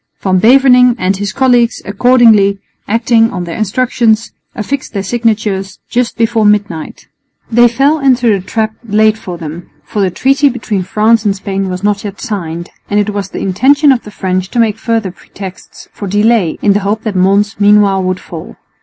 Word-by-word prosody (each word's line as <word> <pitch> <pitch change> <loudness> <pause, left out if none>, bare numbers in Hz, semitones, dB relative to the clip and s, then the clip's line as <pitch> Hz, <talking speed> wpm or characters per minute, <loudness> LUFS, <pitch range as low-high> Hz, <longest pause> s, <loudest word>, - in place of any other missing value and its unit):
Van 185 -1 +1
Beverningh 250 +2 +5
and 190 0 -1
his 200 0 -3
colleagues 245 -2 +2
accordingly, 215 -2 +3 0.3
acting 230 +1 +2
on 180 -4 -5
their 170 -1 -6
instructions, 225 +1 0 0.2
affixed 265 +4 -4
their 200 -2 -3
signatures 210 -3 -2
just 245 0 -1
before 230 -1 +1
midnight. 205 -6 -1 0.4
They 240 +1 +5
fell 275 +6 +1
into 255 -3 +2
the 200 - +1
trap 220 +3 -2
laid 215 -1 +2
for 185 -5 -8
them, 165 +1 -8
for 210 - -4
the 190 - +2
treaty 275 +9 +2
between 225 -6 -3
France 215 +4 +1
and 200 -2 0
Spain 195 -1 -3
was 180 +1 -5
not 205 -1 0
yet 200 -1 -7
signed, 170 -7 -5 0.2
and 205 - +1
it 210 0 0
was 200 -1 -4
the - - -6
intention 275 - +3
of 250 -3 +1
the - - -10
French 185 -2 -3
to 240 - -2
make 225 -2 +1
further 225 -5 -1
pretexts 190 0 -11
for 200 - -7
delay 205 -3 +1
in 205 - +4
the 205 - +1
hope 205 +2 -2
that 215 -3 -3
Mons 200 +3 +1
meanwhile 205 -1 +4
would 185 0 -2
fall. 165 -2 -10
210 Hz, 180 wpm, -12 LUFS, 195-235 Hz, 0.4 s, Beverningh